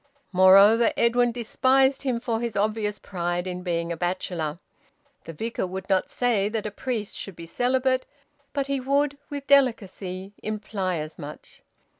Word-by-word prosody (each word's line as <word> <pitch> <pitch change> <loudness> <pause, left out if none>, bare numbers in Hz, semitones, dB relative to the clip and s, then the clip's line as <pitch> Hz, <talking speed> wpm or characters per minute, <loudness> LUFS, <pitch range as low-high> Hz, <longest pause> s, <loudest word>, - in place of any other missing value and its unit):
Moreover, 195 +5 +7
Edwin 240 +1 +3
despised 260 +3 +2
him 255 -4 -1
for 230 -2 -2
his 235 -3 -3
obvious 210 0 0
pride 175 -2 -3
in 180 -1 -4
being 170 -2 -2
a - - -1
bachelor. 175 -3 -2 0.7
The 165 - -7
Vicar 225 +3 -3
would 190 +1 -6
not 190 -1 +2
say 225 -5 +1
that 220 -1 -3
a 215 - -3
priest 220 -1 -4
should 195 - -7
be 170 - -9
celibate, 255 +6 0 0.4
but 280 -2 -1
he 275 0 -1
would, 280 +2 0
with 285 -1 -5
delicacy, 200 -8 +1
imply 210 -3 -3
as 155 -1 -6
much. 150 +1 -9
210 Hz, 155 wpm, -25 LUFS, 185-245 Hz, 0.7 s, Moreover